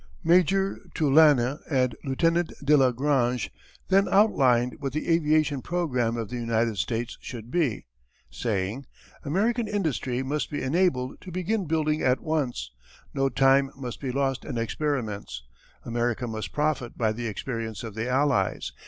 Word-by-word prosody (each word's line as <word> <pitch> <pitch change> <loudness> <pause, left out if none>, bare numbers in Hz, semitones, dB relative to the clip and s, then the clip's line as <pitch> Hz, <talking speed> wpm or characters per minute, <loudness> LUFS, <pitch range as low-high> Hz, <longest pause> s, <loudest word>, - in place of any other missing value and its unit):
Major 185 +3 +3 0.2
Tulasne 145 -3 +4
and 130 -5 +1
Lieutenant 165 +5 +1
de 150 +2 +6
la 135 -3 +5
Grange 125 -2 0 0.4
then 195 +1 +4
outlined 125 - +3
what 135 -3 -4
the 155 - -3
aviation 155 -4 +2
programme 125 -10 -1
of 115 -3 -4
the 125 - -4
United 115 -2 0
States 115 +4 -2
should 120 -1 -8
be, 150 -9 0 0.5
saying: 110 +3 -2 0.4
"American 220 - 0
industry 145 - -1
must 145 +3 -2
be 145 - -3
enabled 130 -3 0
to 185 - -9
begin 185 +3 -1
building 155 -1 0
at 130 0 +2
once. 135 - -2 0.4
No 135 0 +1
time 135 +1 +4
must 125 -3 -6
be 135 -3 -2
lost 135 0 -1
in - - -5
experiments. 115 - -3 0.4
America 120 +1 -1
must 110 -2 -5
profit 150 -5 -1
by 110 -2 +1
the 115 +2 -4
experience 115 -1 -4
of 115 -3 -6
the 110 +4 -3
Allies. 140 +2 +1
135 Hz, 145 wpm, -26 LUFS, 120-155 Hz, 0.5 s, de